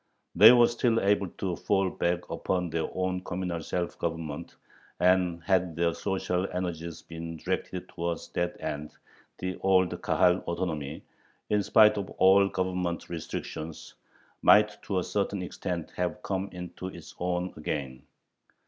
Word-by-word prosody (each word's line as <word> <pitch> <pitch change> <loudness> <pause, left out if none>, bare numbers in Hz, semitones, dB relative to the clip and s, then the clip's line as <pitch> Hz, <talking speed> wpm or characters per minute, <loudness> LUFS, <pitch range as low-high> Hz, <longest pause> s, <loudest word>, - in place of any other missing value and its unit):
They 105 +6 +10
were 120 -1 +7
still 120 -1 +1
able 100 -1 +2
to 90 +1 -3
fall 95 0 +1
back 85 0 -1
upon 90 -3 -1
their 80 0 -1
own 95 0 -2
communal 90 -2 -3
self 85 +2 -3
government, 80 -1 -4 0.4
and, 90 -2 +3
had 90 -2 +1
their 85 0 +1
social 95 -1 -1
energies 85 -2 -4
been 80 0 -7
directed 90 +3 -3
towards 85 -1 -4
that 85 0 -2
end, 75 +1 -5 0.4
the 90 0 -4
old 95 -1 +3
Kahal 90 -1 +3
autonomy, 80 -4 -3 0.5
in 105 -1 +3
spite 105 +1 +5
of 100 - -5
all 95 +1 +6
Government 90 -2 -2
restrictions, 80 -1 -6 0.5
might 105 0 +5
to 95 - -2
a 90 - +1
certain 100 -1 -1
extent 90 -2 -4
have 90 -1 -2
come 95 0 -2
into 90 +1 -7
its 85 -3 -10
own 90 0 -1
again. 70 -4 -4
90 Hz, 140 wpm, -28 LUFS, 85-95 Hz, 0.5 s, They